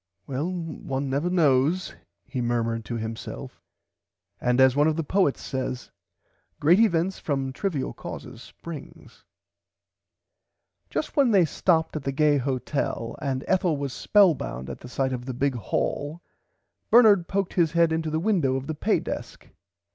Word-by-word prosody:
Well 145 +6 -2
one 145 -6 -4
never 145 +6 0
knows 160 +1 +2 0.3
he 130 - -4
murmerd 115 -1 -1
to 120 - -4
himself 110 0 -6 0.8
and 125 +1 +1
as 130 -1 +6
one 145 +1 +4
of 160 - +1
the 165 - -1
poets 185 -2 +1
says 130 -1 -4 0.7
great 170 +7 +5
events 190 -4 +2
from 135 -3 -2
trivil 150 -4 -2
causes - - -8
springs. 165 -4 -11 1.7
Just 310 - -3
then 275 -4 +4
they 195 -6 +5
stopped 160 0 +1
at 155 - -2
the 135 - -2
gay 150 +1 +3
hotel 130 -2 -2
and 135 -2 -2
Ethel 180 -5 +2
was 140 -2 -4
spellbound 150 - +2
at - - -8
the 125 - -11
size 130 +1 -1
of 125 -1 -5
the 130 -2 -5
big 140 +2 +1
hall 145 - -2 0.7
Bernard 210 -7 +6
poked 195 -2 -1
his 170 -3 +2
head 170 -1 +4
into 160 0 -1
the 155 +1 -1
window 170 -9 +1
of 135 0 -3
the 160 - -3
pay 205 +8 +1
desk. - - -7
145 Hz, 155 wpm, -25 LUFS, 130-175 Hz, 1.7 s, as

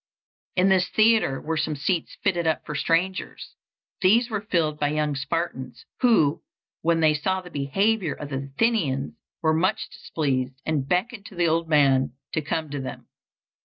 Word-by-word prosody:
In 185 +1 +4
this 185 -1 +3
theatre 215 -11 +3
were 160 +1 -3
some 155 0 -1
seats 165 +4 -2
fitted 175 -4 +1
up 160 - 0
for 150 - -5
strangers. 170 +5 -1 0.5
These 230 +6 +4
were 210 -2 -1
filled 165 -7 0
by 145 - +2
young 150 0 0
Spartans, 135 -3 -4
who, 215 - +3 0.4
when 165 0 +2
they 155 -1 +5
saw 185 +5 0
the 180 -1 -11
behavior 180 +6 0
of 145 - -7
the 135 0 -4
Athenians, 160 - +1 0.3
were 160 -1 +3
much 185 +7 0
displeased, 130 -4 -2
and 150 -4 -1
beckoned 205 +3 -1
to 195 - -13
the 175 -1 +2
old 165 0 0
man 135 -4 +3 0.2
to 155 - 0
come 155 0 -3
to 145 -2 -3
them. 130 - -8
160 Hz, 165 wpm, -25 LUFS, 145-190 Hz, 0.5 s, they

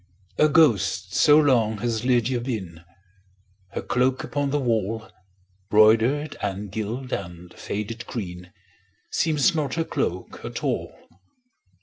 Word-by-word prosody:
A 155 - +5
ghost 150 - +3
so 145 0 +6
long 120 -8 +3
has 110 +1 -2
Lydia 125 -1 +1
been, 95 -10 -5 0.9
Her - - -4
cloak 130 +1 +1
upon 145 -1 -2
the 145 +1 0
wall, 110 -3 -1 0.6
Broidered, 115 +8 +4
and 100 0 -4
gilt, 115 +5 -4
and 90 -2 -6
faded 110 +3 -5
green, 90 -5 -6 0.6
Seems 160 +2 +2
not 145 -5 -1
her 165 - 0
cloak - - -3
at - - -6
all. - - -1
115 Hz, 120 wpm, -24 LUFS, 105-140 Hz, 0.9 s, so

